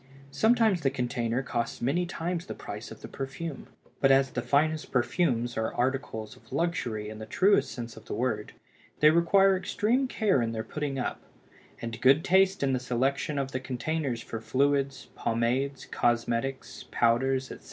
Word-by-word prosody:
Sometimes 220 - +3
the 135 - +2
container 125 -1 -1
costs 120 -2 -3
many 160 +9 0
times 170 0 -3
the - - -5
price - - -7
of - - -11
the - - -7
perfume. 135 +3 -6 0.3
But 135 - +4
as 135 -1 +4
the 125 - -2
finest 155 +4 +1
perfumes 120 -2 +1
are 110 0 0
articles 125 -3 -2
of - - -21
luxury 130 -9 -1
in 110 0 -8
the 110 - -7
truest 185 - +3
sense 120 -2 -6
of 110 - -13
the - - -4
word, 115 -4 -2 0.5
they 150 0 +7
require 190 +4 +5
extreme 230 +7 0
care 205 - +2
in 115 -1 -1
their 110 -1 -3
putting 145 0 -4
up; 125 - -3 0.6
and 115 -1 -5
good 135 +5 +5
taste 190 -1 +3
in 135 -1 +2
the 130 - +1
selection 130 +4 -1
of 135 -1 -2
the 130 - -2
containers 130 -1 -2
for 115 - -6
fluids, 135 +2 0
pomades, 125 +4 -1
cosmetics, 120 +2 -1
powders, 130 +3 +1
etc. - - -8
135 Hz, 170 wpm, -28 LUFS, 120-160 Hz, 0.6 s, they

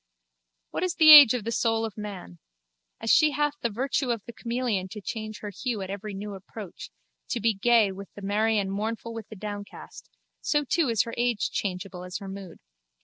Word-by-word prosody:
What - - -3
is 365 -1 -1
the 310 -1 +8
age 285 -6 +11
of 240 - -3
the 230 - -3
soul 225 -1 +1
of 220 -3 -7
man? 195 - -8 0.6
As 225 - 0
she 310 - +6
hath 295 +1 +1
the 235 - 0
virtue 260 +4 -1
of 230 -4 -1
the 235 - -9
chameleon 235 -5 -2
to 210 +3 -8
change 215 +1 -6
her 210 - -5
hue 220 0 -3
at 190 - -6
every 200 +1 -6
new 205 +1 -6
approach, 195 0 -9 0.4
to 240 - -1
be 225 +1 +2
gay 220 0 +3
with 195 +1 -10
the 205 - -10
merry 215 +3 +1
and 195 -2 -1
mournful 225 +3 -3
with 225 -2 -8
the 220 - -9
downcast, 205 0 -8 0.3
so 295 -1 +1
too 320 -2 +1
is 225 -3 +2
her 230 -1 -7
age 240 -3 0
changeable 185 -1 -4
as 180 +1 -5
her 195 - -9
mood. 190 -3 -8
215 Hz, 205 wpm, -26 LUFS, 200-235 Hz, 0.6 s, age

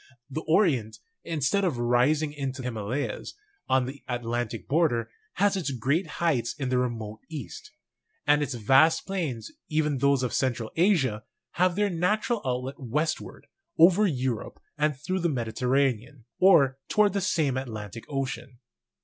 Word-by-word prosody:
The 155 - -3
Orient, 135 - +2 0.3
instead 165 +5 0
of 170 -9 0
rising 130 +6 +2
into 135 -2 -4
Himalayas 125 +3 -4 0.3
on 130 -1 +3
the 135 +2 -8
Atlantic 120 -2 -3
border, 135 -7 +1 0.2
has 200 +1 +2
its 175 -7 -2
great 140 - 0
heights 140 -9 0
in 135 -4 -3
the 125 -1 +2
remote 110 -4 -3
east; 150 -8 -8 0.6
and 145 0 +4
its 140 -3 -2
vast 135 +8 +4
plains, 155 - -3 0.2
even 150 -3 0
those 140 -1 +3
of 125 - -2
Central 120 -4 -1
Asia, 160 - +2 0.3
have 180 0 +2
their 205 0 +1
natural 210 +6 0
outlet 130 +2 -3
westward, 150 +6 -3 0.3
over 185 +5 +6
Europe 130 - -3 0.2
and 150 -2 0
through 185 +7 -2
the 170 -1 +1
Mediterranean, 125 0 -1
or 145 -8 +5
toward 210 -2 +3
the 200 - 0
same 155 -8 +1
Atlantic 115 -5 -6
Ocean. 130 -2 -4
135 Hz, 140 wpm, -27 LUFS, 120-165 Hz, 0.6 s, over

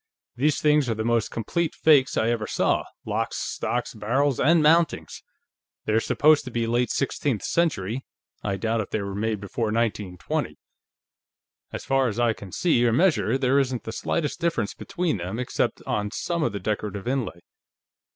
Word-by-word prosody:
"These 145 +4 +1
things 150 -3 +3
are 115 - 0
the 110 - -2
most 115 -1 +1
complete 160 +9 -2
fakes 145 -4 +4
I 110 - +2
ever 110 -2 -2
saw - - +1 0.2
locks, - - -2
stocks, - - -2
barrels 135 +5 0
and 160 +2 +4
mountings. 165 +2 +2 0.6
They're 110 +1 +2
supposed 150 +6 +3
to - - -5
be 120 -1 -1
late 120 +2 +1
sixteenth 135 -5 -1
century; 130 - 0 0.4
I 100 - -2
doubt 115 +3 0
if 100 - -6
they 105 - -2
were 100 0 -5
made 110 +1 -1
before 100 +4 -3
1920. 105 -5 -2 1.1
As - - -6
far 135 -1 +2
as 110 0 -3
I 120 -2 +3
can 100 -3 -11
see 155 - +2
or 120 - +3
measure, 135 -4 +2
there 135 +1 +3
isn't 130 -3 -1
the 110 - -5
slightest 150 +5 -2
difference 165 -11 0
between 180 - -2
them, 90 +4 -5
except 125 0 -1
on 105 -1 -1
some 170 +10 -2
of 120 - +1
the 100 - -4
decorative 105 +1 -3
inlay. 125 -10 -2
120 Hz, 170 wpm, -25 LUFS, 110-145 Hz, 1.1 s, fakes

